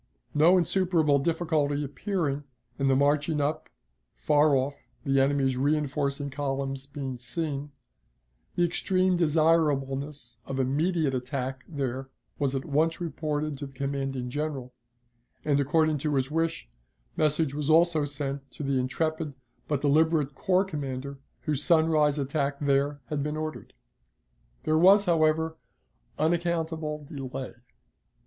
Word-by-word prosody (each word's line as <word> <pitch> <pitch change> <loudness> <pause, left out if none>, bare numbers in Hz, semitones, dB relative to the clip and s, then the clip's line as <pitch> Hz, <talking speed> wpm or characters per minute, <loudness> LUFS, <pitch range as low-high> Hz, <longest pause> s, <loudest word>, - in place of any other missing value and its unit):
No 165 +5 +5
insuperable 170 -5 +3
difficulty 150 -2 0
appearing, 145 -1 -2 0.4
and 135 0 +2
the 135 - +4
marching 145 +2 +2
up 145 +2 -1 0.5
far 150 -1 +3
off, 135 +2 0 0.3
the 135 -2 +2
enemy's 135 -1 +2
reenforcing 140 0 0
columns 135 -1 -3
being 135 -3 -5
seen 145 +2 -3 0.8
the 175 - +3
extreme 185 +2 +1
desirableness 150 -6 +1
of 135 0 -3
immediate 150 +3 +1
attack 130 0 -3
there, 135 -3 -3 0.3
was 140 -1 0
at 135 - -3
once 160 +2 +1
reported 155 -4 -3
to 140 - -5
the 135 - -15
commanding 135 -2 -3
General; 140 -3 -3 0.7
and, 145 -2 +3
according 155 +2 +2
to 150 0 -1
his 135 +1 0
wish, 165 - -1 0.5
message 150 -1 +1
was 150 0 -2
also 165 -1 +4
sent 140 -1 -4
to 150 - -8
the 135 -1 +1
intrepid 155 +3 -2 0.3
but 145 -3 -1
deliberate 150 0 +3
corps 185 +7 +2
commander 140 -5 -5 0.2
whose 150 -2 -1
sunrise 160 -3 +3
attack 140 0 -1
there 140 0 +1
had 150 -2 -1
been 150 +2 -2
ordered. 155 0 -6 0.9
There 155 0 +2
was, 200 +4 +7
however, 160 -1 +2 0.6
unaccountable 160 -2 -1
delay. 135 -3 -6
145 Hz, 125 wpm, -27 LUFS, 135-160 Hz, 0.9 s, was